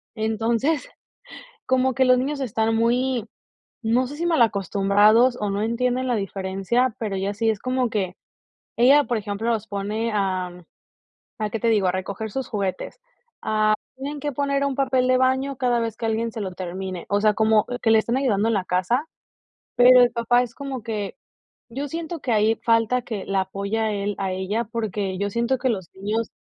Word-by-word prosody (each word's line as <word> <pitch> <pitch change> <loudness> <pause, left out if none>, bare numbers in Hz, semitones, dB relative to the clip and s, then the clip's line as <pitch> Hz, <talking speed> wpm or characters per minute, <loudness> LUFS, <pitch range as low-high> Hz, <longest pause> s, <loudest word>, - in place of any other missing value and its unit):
Entonces, 230 +7 0 0.8
como 260 0 +2
que 260 +1 +3
los 255 0 +5
niños 280 +2 -2
están 225 -2 0
muy, 240 +1 +1 0.6
no 240 +3 +2
sé, 285 - -8
si 335 +3 -3
mal 330 -6 +2
acostumbrados, 210 +4 +3
o 210 -1 -1
no 200 +1 -1
entienden 250 +3 0
la 245 - +1
diferencia, 195 +4 -1
pero 210 -4 -3
ella 195 +1 -2
sí 225 +2 +1
es 215 - -5
como 255 0 0
que 190 -4 -2 0.6
ella 275 +5 +6
por 240 - -1
ejemplo, 210 +2 -3
los 220 -1 -2
pone 210 +3 -2
a 185 -3 -1 0.9
a 215 -1 -1
qué 225 - -3
te 230 - +1
digo, 210 -4 +3
a 180 - +1
recoger 200 +3 -4
sus 265 +1 -3
juguetes, 195 -3 -3 0.9
ah, - - -
tienen 285 +2 -5
que 290 +1 -2
poner 280 +1 0
un 275 - -1
papel 260 -2 +1
de 255 - +4
baño 260 +1 +1
cada 245 -2 +1
vez 230 -2 -3
que - - -7
alguien 225 +1 -1
se 220 -2 -5
lo 190 - -4
termine. 185 0 -5
O 205 0 +1
sea, 215 -1 +5
como 220 0 +3 0.2
que 225 - +3
le 220 - +6
estén 235 +4 0
ayudando 220 -5 +1
en 230 - +1
la 195 -3 0
casa, 235 - 0 0.7
pero 250 +1 +8
el 245 - +4
papá 240 +1 +2
es 240 - -6
como 270 -3 -6
que 210 -3 -4 0.5
yo 275 +5 -4
siento 330 +2 -5
que 250 - -2
ahí 220 +1 +3
falta 230 +2 +2
que 220 -5 -5
la 195 -1 +1
apoya 200 +3 -2
él 205 0 -2
a 195 -1 -2
ella, 190 +5 -2
porque 210 -4 -3
yo 200 0 -1
siento 235 +4 0
que 260 +1 0
los 190 -7 -2
niños 215 +4 -2
225 Hz, 195 wpm, -23 LUFS, 200-255 Hz, 0.9 s, pero